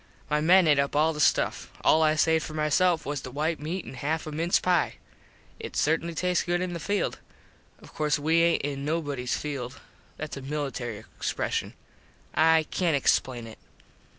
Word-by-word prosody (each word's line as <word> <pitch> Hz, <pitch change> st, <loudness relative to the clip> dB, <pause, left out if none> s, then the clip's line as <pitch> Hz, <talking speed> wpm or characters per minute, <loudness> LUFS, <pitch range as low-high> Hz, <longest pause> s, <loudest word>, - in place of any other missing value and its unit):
My 150 Hz, 0 st, +2 dB
men 180 Hz, +3 st, +6 dB
ate 145 Hz, -2 st, +4 dB
up 140 Hz, +1 st, 0 dB
all 155 Hz, +2 st, +3 dB
the 150 Hz, -, -7 dB
stuff. -, -, +1 dB
All 160 Hz, -, +4 dB
I 155 Hz, 0 st, +4 dB
saved 160 Hz, 0 st, +3 dB
for 155 Hz, -, -7 dB
my 150 Hz, 0 st, 0 dB
self 175 Hz, +1 st, +2 dB
was 145 Hz, -1 st, -3 dB
the -, -, -7 dB
white 155 Hz, +5 st, -1 dB
meat 165 Hz, +4 st, -4 dB
an -, -, -9 dB
half 150 Hz, +5 st, -2 dB
a 155 Hz, -, -6 dB
mince 165 Hz, +4 st, +1 dB
pie. 180 Hz, -3 st, +1 dB, 0.6 s
It -, -, -7 dB
certainly 165 Hz, +2 st, 0 dB
tastes 180 Hz, +1 st, +1 dB
good 175 Hz, 0 st, 0 dB
in 180 Hz, -1 st, -3 dB
the 170 Hz, -, -4 dB
field. 200 Hz, +5 st, -1 dB, 0.6 s
Of -, -, -16 dB
course 150 Hz, -1 st, +1 dB
we 160 Hz, +3 st, +2 dB
aint 170 Hz, 0 st, +2 dB
in 140 Hz, -1 st, -3 dB
nobodies 145 Hz, -5 st, -2 dB
field. 135 Hz, -4 st, -5 dB, 0.4 s
Thats 155 Hz, -2 st, -6 dB
a -, -, -6 dB
military 130 Hz, -6 st, -4 dB, 0.2 s
expreshun. -, -, -2 dB, 0.6 s
I 160 Hz, 0 st, +4 dB
cant 170 Hz, -5 st, +1 dB
explain 125 Hz, -3 st, +1 dB
it. 110 Hz, -1 st, -11 dB
155 Hz, 185 wpm, -27 LUFS, 145-165 Hz, 0.6 s, men